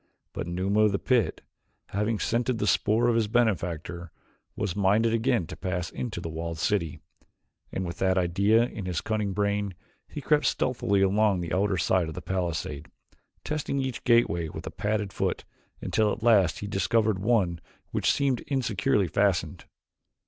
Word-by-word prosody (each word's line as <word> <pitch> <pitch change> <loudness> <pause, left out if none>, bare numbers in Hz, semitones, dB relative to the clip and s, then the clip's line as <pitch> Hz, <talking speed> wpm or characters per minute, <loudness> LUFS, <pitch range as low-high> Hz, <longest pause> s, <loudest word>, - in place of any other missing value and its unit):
But - - -4
Numa 95 +4 0
of 105 -2 +4
the - - +2
pit, 125 +1 +1 0.5
having 105 +3 0
scented 120 +3 0
the 105 - -1
spoor 110 +3 +2
of 120 - +3
his 115 -2 +2
benefactor, 85 -7 -1 0.4
was 100 -5 -2
minded 105 +3 +3
again 115 -4 +1
to - - -8
pass 90 -2 -3
into 110 -7 -4
the 85 - -5
walled 80 +1 -4
city, 85 -2 -1 0.7
and 95 - -3
with 85 -1 -6
that 95 0 +2
idea 100 +6 +3
in 110 -6 -5
his 90 -3 -1
cunning 105 -2 -1
brain 100 -1 -1 0.3
he - - -7
crept 150 +1 +2
stealthily 100 -6 +1
along 100 0 +3
the 85 -1 -4
outer 95 0 +1
side 85 +1 +2
of 80 - -7
the - - -5
palisade, 80 -5 -3 0.5
testing 150 -2 -2
each 130 -3 -3
gateway 85 -9 +3
with - - -8
a - - -5
padded 105 0 -2
foot - - -1 0.4
until 110 -1 +1
at 115 - -5
last 100 -8 +4
he - - -4
discovered 105 +1 +1
one 95 -6 +1 0.3
which - - +2
seemed 135 -4 +1
insecurely 110 -7 +1
fastened. 100 0 0
100 Hz, 165 wpm, -27 LUFS, 90-115 Hz, 0.7 s, of